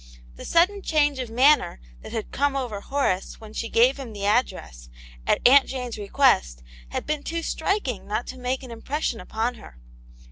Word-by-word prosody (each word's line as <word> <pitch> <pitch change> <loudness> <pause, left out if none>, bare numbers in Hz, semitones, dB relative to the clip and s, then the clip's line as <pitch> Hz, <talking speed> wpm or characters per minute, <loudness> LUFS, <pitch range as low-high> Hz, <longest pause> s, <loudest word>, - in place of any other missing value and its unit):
The - - -10
sudden 370 +4 +3
change 295 -5 +1
of 250 -3 -4
manner 255 - +3 0.2
that - - -10
had 220 -2 -4
come 285 0 0
over 240 -7 -3
Horace 270 -10 -1
when 215 -1 -12
she 230 - -4
gave 245 +4 +4
him 245 -5 -7
the 200 -1 -5
address, 185 - -1 0.4
zX - - +4
Aunt 270 +2 +7
Jane's 250 -4 -5
request, 200 - +2 0.3
had - - -4
been 305 -1 -2
too 335 +2 -4
striking 320 - -2
not 215 +4 -2
to 260 - -13
make 255 +1 -2
an 255 - -9
impression 235 0 -3
upon 225 +6 -2
her. - - -14
250 Hz, 180 wpm, -24 LUFS, 215-285 Hz, 0.4 s, Aunt